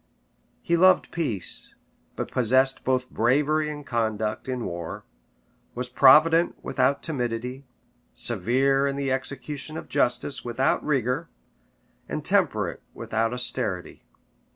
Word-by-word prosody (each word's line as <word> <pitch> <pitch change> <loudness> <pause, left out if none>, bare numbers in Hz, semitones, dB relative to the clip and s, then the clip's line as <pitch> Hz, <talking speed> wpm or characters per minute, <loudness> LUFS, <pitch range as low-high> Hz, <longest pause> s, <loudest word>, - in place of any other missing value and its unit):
He 170 - +1
loved 185 +2 +4
peace, 120 - -2 0.4
but - - -5
possessed 130 +2 +2
both 130 -1 0
bravery 150 +6 +2
and 145 -1 -7
conduct 110 -1 -2
in 125 -2 -3
war; 85 -1 -6 0.7
was 125 0 -4
provident 155 +6 +5
without 140 +2 +1
timidity; 125 -2 -4 0.5
severe 130 +6 +1
in 140 - -2
the 140 -1 -2
execution 140 +3 -4
of - - -8
justice 125 +3 0
without 120 +2 0
rigor; 135 +2 -1 0.8
and - - -4
temperate - - +1
without 115 +1 -1
austerity. 125 -7 -3
130 Hz, 110 wpm, -25 LUFS, 120-145 Hz, 0.8 s, provident